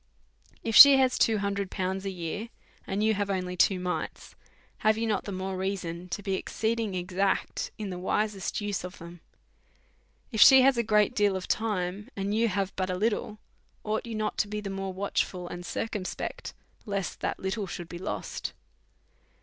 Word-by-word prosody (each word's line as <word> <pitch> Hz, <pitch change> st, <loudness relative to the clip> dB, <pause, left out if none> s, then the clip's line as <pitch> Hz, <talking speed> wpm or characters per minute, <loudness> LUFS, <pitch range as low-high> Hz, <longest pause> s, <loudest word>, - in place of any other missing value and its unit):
If 225 Hz, -, -1 dB
she 280 Hz, -1 st, +12 dB
has 260 Hz, -1 st, +3 dB
two 225 Hz, -1 st, +3 dB
hundred 200 Hz, -1 st, -2 dB
pounds 190 Hz, 0 st, -3 dB
a -, -, -1 dB
year, 185 Hz, +5 st, -5 dB, 0.4 s
and 200 Hz, +2 st, -1 dB
you 220 Hz, 0 st, +3 dB
have 205 Hz, -1 st, -2 dB
only 180 Hz, -2 st, -2 dB
two 185 Hz, +1 st, +3 dB
mites, 180 Hz, 0 st, -4 dB, 0.5 s
have 215 Hz, 0 st, +3 dB
you 230 Hz, -, -1 dB
not 210 Hz, -3 st, -1 dB
the 200 Hz, -, -5 dB
more 190 Hz, 0 st, -3 dB
reason 180 Hz, -2 st, -4 dB
to 205 Hz, -, -4 dB
be 195 Hz, -1 st, -1 dB
exceeding 220 Hz, +1 st, -1 dB
exact 185 Hz, +2 st, -1 dB
in 210 Hz, -3 st, -4 dB
the 180 Hz, -, -5 dB
wisest 200 Hz, +1 st, -1 dB
use 205 Hz, -3 st, -2 dB
of 180 Hz, +1 st, -8 dB
it? 170 Hz, +1 st, -10 dB, 1.1 s
If 220 Hz, -3 st, 0 dB
she 265 Hz, -1 st, +9 dB
has 270 Hz, 0 st, +5 dB
a 210 Hz, -3 st, +3 dB
deal 205 Hz, -2 st, +1 dB
of 185 Hz, -, -4 dB
time, 205 Hz, -2 st, -2 dB
and 200 Hz, +1 st, -2 dB
you 230 Hz, +2 st, +3 dB
have 195 Hz, -2 st, -2 dB
but 185 Hz, -1 st, -2 dB
a 185 Hz, -, -1 dB
little, 215 Hz, +1 st, -1 dB, 0.5 s
ought 215 Hz, +2 st, -2 dB
you 230 Hz, -, -5 dB
not 215 Hz, 0 st, -2 dB
to 210 Hz, -, +2 dB
be 210 Hz, +1 st, -4 dB
the 200 Hz, -2 st, -5 dB
more 195 Hz, 0 st, -4 dB
watchful 185 Hz, -1 st, -2 dB
and 175 Hz, 0 st, -7 dB
circumspect, 205 Hz, 0 st, -4 dB, 0.3 s
lest 200 Hz, -2 st, -3 dB
that -, -, -2 dB
little 190 Hz, +1 st, -3 dB
should 175 Hz, -1 st, -6 dB
be 175 Hz, 0 st, -8 dB
lost? -, -, -4 dB
200 Hz, 180 wpm, -28 LUFS, 185-215 Hz, 1.1 s, she